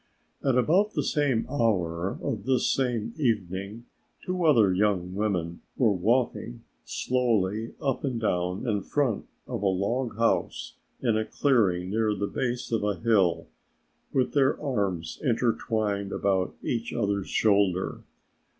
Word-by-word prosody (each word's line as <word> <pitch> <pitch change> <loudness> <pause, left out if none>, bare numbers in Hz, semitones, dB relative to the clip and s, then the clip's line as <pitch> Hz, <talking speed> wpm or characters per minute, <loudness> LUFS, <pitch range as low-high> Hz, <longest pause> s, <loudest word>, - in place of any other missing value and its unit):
At 135 -3 +2
about 185 - +3
the - - +1
same 140 -7 +1
hour 95 - 0
of 115 -8 -3
this 130 -2 +2
same 120 -4 -1
evening, 105 - -2 0.4
two 180 -1 -1
other 115 - +5
young 90 -2 +1
women 90 -5 -2 0.2
were 120 -5 +4
walking 105 - 0 0.2
slowly 115 -4 0
up 135 -3 -1
and 130 -5 -1
down 90 0 -1
in 105 -3 +1
front 125 0 -1 0.2
of - - -4
a 100 - +2
log 105 +6 -1
house 115 0 0 0.3
in 115 -3 +2
a 110 - +1
clearing 100 -9 +1
near 110 0 +1
the 100 +1 -1
base 120 +3 -3
of 115 -2 0
a 105 -1 0
hill, 100 -7 +2 0.7
with 130 -2 +1
their 140 -1 +3
arms 100 - -2
intertwined 110 -5 0
about 95 -2 0
each 115 -2 -2
other's 100 -4 -1
shoulder. 100 -4 +2
110 Hz, 135 wpm, -27 LUFS, 95-125 Hz, 0.7 s, other